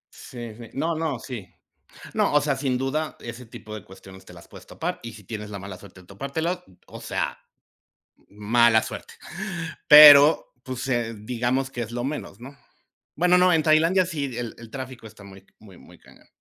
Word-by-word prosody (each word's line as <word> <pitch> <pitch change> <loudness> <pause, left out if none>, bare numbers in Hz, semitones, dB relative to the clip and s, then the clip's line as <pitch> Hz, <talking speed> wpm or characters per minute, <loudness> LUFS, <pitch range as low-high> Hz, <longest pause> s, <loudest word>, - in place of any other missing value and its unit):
Sí 120 -3 -9
sí. 115 +1 -12
No 160 +5 -1
no, 155 -4 -2
sí. 115 -6 -8 0.6
No, - - +1
o 150 - +5
sea, 145 -1 0
sin 135 -2 -1
duda 140 +5 -2
ese 120 +1 -9
tipo 110 -1 -10
de 105 - -8
cuestiones 95 0 -15
te 90 - -13
las 85 - -14
puedes - - -14
topar, - - -5
y 115 -1 -8
si 105 -2 -14
tienes 105 0 -7
la 100 -1 -7
mala 95 -1 -9
suerte 95 -2 -15
de - - -22
topártelo, 160 - -4 0.2
o - - -11
sea, - - -3 0.9
mala 110 +2 +3
suerte. - - -8 0.7
Pero, 150 0 +9
pues, 130 +1 -6
eh, 120 -3 -1
digamos 125 +5 -2
que 120 - -5
es 115 0 -7
lo 120 0 -3
menos, 135 -7 -6
¿no? 135 +3 -11 0.6
Bueno, 180 +3 +4
no, 180 0 +4
en 160 -2 +3
Tailandia 165 +4 +3
sí, 155 -5 -3
el 120 -2 -5
el 115 -1 -12
tráfico 130 -3 -8
está 105 -2 -14
muy 95 0 -14
muy 100 -4 -16
muy - - -17
cañón. - - -21
120 Hz, 190 wpm, -24 LUFS, 110-145 Hz, 0.9 s, Pero